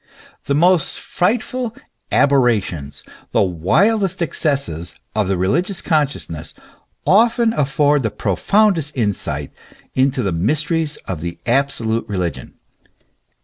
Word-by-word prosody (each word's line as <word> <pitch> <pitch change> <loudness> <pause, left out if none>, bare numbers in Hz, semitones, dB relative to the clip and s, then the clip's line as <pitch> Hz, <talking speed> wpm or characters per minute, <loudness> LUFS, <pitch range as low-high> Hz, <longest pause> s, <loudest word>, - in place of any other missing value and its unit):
The 140 - 0
most 175 +1 +2
frightful 235 +4 -1 0.2
" - - -47
aberrations," 110 - +1 0.3
the - - +4
wildest 175 - +1
excesses 140 - -1 0.2
of 105 -3 +1
the 95 -1 0
religious 170 - 0
consciousness, 135 - -2 0.5
often 230 +3 +4
afford 145 -1 +2
the 110 - 0
profoundest 160 - +1
insight 85 - -1 0.4
into 130 0 +1
the 100 - 0
mysteries 150 - 0
of 90 -5 -5
the 85 +1 -5
absolute 115 -3 0
religion. 90 -4 -4
135 Hz, 105 wpm, -19 LUFS, -, 0.5 s, the